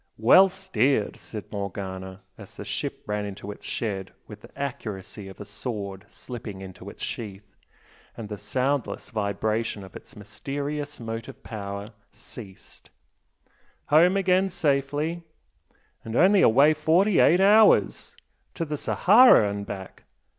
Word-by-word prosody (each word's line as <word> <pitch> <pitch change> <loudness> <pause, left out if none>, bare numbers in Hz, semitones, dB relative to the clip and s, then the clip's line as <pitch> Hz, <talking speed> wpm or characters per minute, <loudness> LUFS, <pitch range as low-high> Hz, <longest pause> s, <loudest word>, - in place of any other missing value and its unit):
"Well 185 - +7
steered!" 125 - 0
said 105 -3 -9
Morgana, 95 -1 -6
as - - -13
the - - -8
ship - - -4
ran 105 0 -2
into 100 0 -6
its - - -12
shed 95 -5 -3
with 105 -1 -12
the - - -14
accuracy 110 -7 -5
of 95 - -12
a 105 - -7
sword 100 -2 -6
slipping 115 -4 -8
into 95 -1 -10
its - - -10
sheath, 100 -3 -7 0.6
and 115 - -6
the 105 - -5
soundless 130 +5 -2
vibration 110 0 -2
of 95 - -13
its 135 - -12
mysterious 145 +7 -5
motive 115 -1 -7
power 100 0 -6 0.2
ceased 105 -2 -12 1.0
"Home 175 +6 +5
again 190 0 +2
safely! 150 +1 -1 0.8
and 115 0 -6
only 190 +6 +5
away 140 +7 +6
forty 165 +6 +3
eight 175 - +5
hours! 210 +3 +4 0.4
To 165 - -2
the 150 -1 -4
Sahara 215 - +6
and 100 0 -5
back! 95 -2 -8
115 Hz, 130 wpm, -25 LUFS, 100-150 Hz, 1.0 s, Well